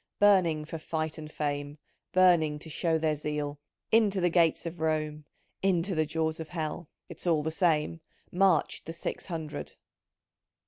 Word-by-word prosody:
— - - -60
Burning 180 -7 +4
for 165 +1 -6
fight 155 0 -3
and 155 -1 -8
fame 145 -1 -3 0.2
— - - -52
Burning 175 -5 +4
to 155 +2 -10
show 165 +1 +1
their 155 -1 +1
zeal 150 -1 -3 0.2
= - - -57
3* - - +9
Into 205 -3 +1
the 175 -1 +2
gates 170 -2 +3
of 170 0 -5
Rome, 155 -1 -1 0.4
Into 190 0 +1
the 155 -2 +1
jaws 160 0 -1
of 160 - -5
Hell, 160 -1 -4 0.2
(It's - - -8
all 160 -3 +3
the 160 - -1
same)! 165 -1 +1 0.3
Marched 190 -1 +2
the 165 - -4
Six 165 - -5
Hundred 160 -4 -5
160 Hz, 180 wpm, -29 LUFS, 150-175 Hz, 0.4 s, 3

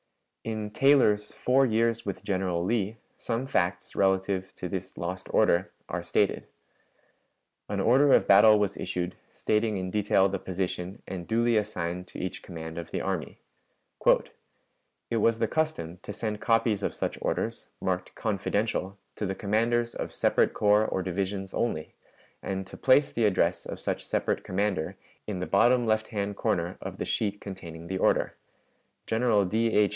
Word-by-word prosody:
In 110 -2 -4
Taylor's 110 -5 +4
"Four 135 +1 +3
Years 115 0 +1
with 100 -2 -5
General 90 -3 -1
Lee" 110 0 0 0.2
some 120 +2 -3
facts 90 -8 -1
relative 95 0 +1
to 90 - -5
this 95 0 -5
lost 90 +2 -5
order 85 +2 +3 0.2
are - - -3
stated. - - 0 1.2
An - - -1
order 135 +4 +5
of - - +5
battle 105 +2 +8
was 100 -1 0
issued, 90 0 -3 0.2
stating 105 -1 0
in 95 0 -3
detail 100 -2 +3
the 95 0 -3
position 95 +2 -4
and 90 -2 -6
duly 115 +1 +2
assigned 90 -4 -2
to - - -10
each 95 - -4
command 80 -2 -7
of 85 - -7
the - - -3
army: - - -3 1.7
"It 115 - +1
was 115 +1 +3
the 115 - +1
custom 105 - -2
to - - -7
send 105 0 -4
copies 115 -3 +2
of - - -2
such - - -3
orders, - - -2
marked 95 -1 -2
'confidential,' 100 -1 -1 0.2
to 105 - -2
the 95 - -2
commanders 115 +4 +1
of - - -5
separate - - +2
corps 105 +1 +4
or 95 - -1
divisions 95 +1 -3
only, 80 -10 -2 0.5
and 95 0 -3
to - - -11
place 135 +2 +4
the 115 - +1
address 100 -3 +1
of - - -6
such - - -2
separate - - -1
commander 95 -3 -1 0.3
in 100 -4 -3
the 90 - -2
bottom 120 +6 +4
left 110 0 +1
hand 100 -2 -3
comer 85 -1 -1
of - - -6
the - - -3
sheet 105 -2 -1
containing 85 -4 -8
the 95 +2 -3
order. - - +2 0.7
General 110 -3 +2
D. 110 +5 +1
H. 105 -1 +4
100 Hz, 160 wpm, -28 LUFS, 95-110 Hz, 1.7 s, battle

